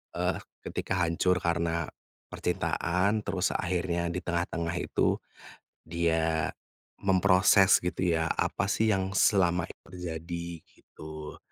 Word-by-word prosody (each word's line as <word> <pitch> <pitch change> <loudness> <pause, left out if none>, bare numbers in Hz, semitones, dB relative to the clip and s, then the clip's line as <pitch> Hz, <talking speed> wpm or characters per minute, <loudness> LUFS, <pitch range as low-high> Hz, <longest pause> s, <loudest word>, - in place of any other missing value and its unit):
eee, - - 0 0.3
ketika - - -3
hancur 85 +2 +2
karena 85 -1 0 0.4
percintaan, 95 +5 0
terus 90 -2 0
akhirnya 85 -1 -1
di 90 +1 -3
tengah-tengah 85 -1 -2
itu, - - +1 0.7
dia 80 -1 +1 0.5
memproses 95 +1 +5
gitu 90 -1 0
ya, 80 - 0
apa 100 - 0
sih 110 +1 +2
yang 95 -1 0
selama 90 -5 +3
ini - - -11
terjadi, 85 -1 -5 0.2
gitu. 75 -1 -10
85 Hz, 110 wpm, -29 LUFS, 85-95 Hz, 0.7 s, memproses